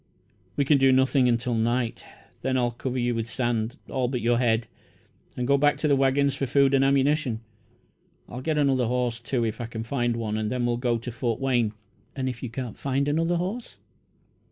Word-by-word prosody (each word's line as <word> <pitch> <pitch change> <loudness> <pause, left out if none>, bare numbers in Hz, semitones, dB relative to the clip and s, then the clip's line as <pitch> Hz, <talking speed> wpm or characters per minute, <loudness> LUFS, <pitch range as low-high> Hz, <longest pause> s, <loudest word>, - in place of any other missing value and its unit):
"We 140 - +1
can 140 0 +4
do 135 0 +5
nothing 130 0 +3
until 120 +1 0
night. 115 +1 0 0.4
Then 130 0 0
I'll 120 -1 +1
cover 125 +2 -4
you 120 -1 +1
with 115 0 -3
sand 120 +1 -1
all 130 -2 -1
but 125 0 -2
your 120 +1 +2
head, 115 -2 +2 0.7
and 125 - -1
go 140 +2 +3
back 145 +1 +3
to 155 - 0
the 145 - +4
waggons 135 +1 +2
for 135 0 -2
food 140 +1 +3
and 135 0 +4
ammunition. 135 -3 +2 0.9
I'll 125 - -7
get 155 +2 -1
another 135 -4 +2
horse, 120 -1 -1
too, 120 0 -1
if 110 +1 -3
I 120 - -4
can 115 -1 -5
find 120 -1 -1
one, 110 -2 -2
and 110 -1 -2
then 125 -1 -1
we'll 120 0 0
go 120 -1 0
to 120 +2 -6
Fort 115 0 -2
Wayne." 120 -5 +1 0.4
"And 130 -1 -2
if 125 -2 -4
you 125 - -4
can't 120 -1 -5
find 140 +1 0
another 165 +4 +1
horse?" 195 +8 -4
125 Hz, 205 wpm, -26 LUFS, 120-135 Hz, 0.9 s, do